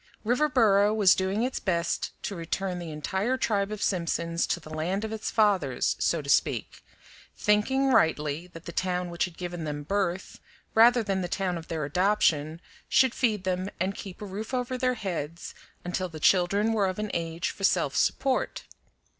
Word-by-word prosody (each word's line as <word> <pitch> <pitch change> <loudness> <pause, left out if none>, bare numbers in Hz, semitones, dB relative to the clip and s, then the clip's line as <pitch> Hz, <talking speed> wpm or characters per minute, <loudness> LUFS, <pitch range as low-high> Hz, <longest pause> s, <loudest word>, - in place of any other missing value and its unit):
Riverboro 225 -5 +3
was 200 -4 +6
doing 190 +4 0
its 255 +1 -2
best 170 -3 -1
to 200 - -3
return 180 +2 -3
the 170 -2 -6
entire 190 - -1
tribe 205 -5 0
of 210 -1 -4
Simpsons 170 -2 0
to - - -1
the 155 -1 -13
land 180 +7 -1
of 220 - -5
its 220 0 -3
fathers, 190 - +2
so 165 -3 +1
to - - -10
speak, 135 - 0 0.5
thinking 265 +6 +2
rightly 155 -1 +1
that 165 -1 -13
the - - -6
town 180 0 -1
which 170 - 0
had 180 -3 -11
given 175 -2 -5
them 145 -1 -4
birth, 190 +1 -2 0.3
rather 235 +1 +6
than 195 -2 -1
the 180 - -2
town 185 0 -1
of 165 -1 -7
their 160 -3 -3
adoption, 160 -2 +1 0.3
should 260 -3 +4
feed 215 -6 0
them 185 +1 -1
and 190 +3 0
keep 195 0 -9
a - - -4
roof 210 +6 -5
over 250 0 -2
their 255 0 0
heads 170 -6 -5 0.3
until 180 +1 -2
the 160 -2 -9
children 200 +6 +3
were 205 -3 +2
of 185 - -3
an 210 -1 -3
age 165 0 -2
for 195 - -11
self - - +2
support. 265 -2 0
190 Hz, 180 wpm, -27 LUFS, 170-210 Hz, 0.5 s, was